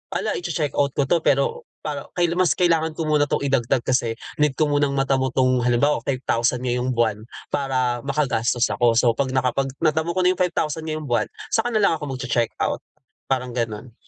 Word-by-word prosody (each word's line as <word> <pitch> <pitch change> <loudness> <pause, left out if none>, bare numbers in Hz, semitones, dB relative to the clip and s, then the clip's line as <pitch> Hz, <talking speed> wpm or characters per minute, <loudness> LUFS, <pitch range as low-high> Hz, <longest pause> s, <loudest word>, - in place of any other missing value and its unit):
hala, - - -1
iche-checkout 150 -5 -1
ko 140 - +2
'to 170 +6 +2
pero 470 - 0 0.2
para - - -4
kaila 175 0 +1
mas 185 - +3
kailangan 165 -3 +2
ko 165 - -2
muna 150 -1 +2
'tong 140 - -1
idagdag 125 -3 +1
kasi 120 -3 0 0.2
need 150 -2 +2
ko 150 -2 +1
munang 145 -1 +1
matamo 135 -1 +1
'tong 130 -1 +3
halimbawa, 135 +4 +2
5,000 125 -1 0
ngayong 125 0 -1
buwan 110 -3 +1 0.3
para 130 -3 0
makagastos 120 -5 0
ako. 120 -2 +2
So, 120 0 +4
'pag 130 +2 -2
nakapag 130 +1 +1 0.2
natamo 160 +2 +1
ko 185 - +1
na 180 - +5
yung 185 - -5
5,000 160 -3 -1
ngayong 155 0 -3
buwan 120 - +1 0.2
saka 240 +2 +1
nalang 200 -7 +3
ako 140 -3 -4
magche-checkout, 120 -2 -1 0.5
parang 125 -2 -1
gano'n. 115 0 -4
135 Hz, 180 wpm, -22 LUFS, 125-155 Hz, 0.5 s, na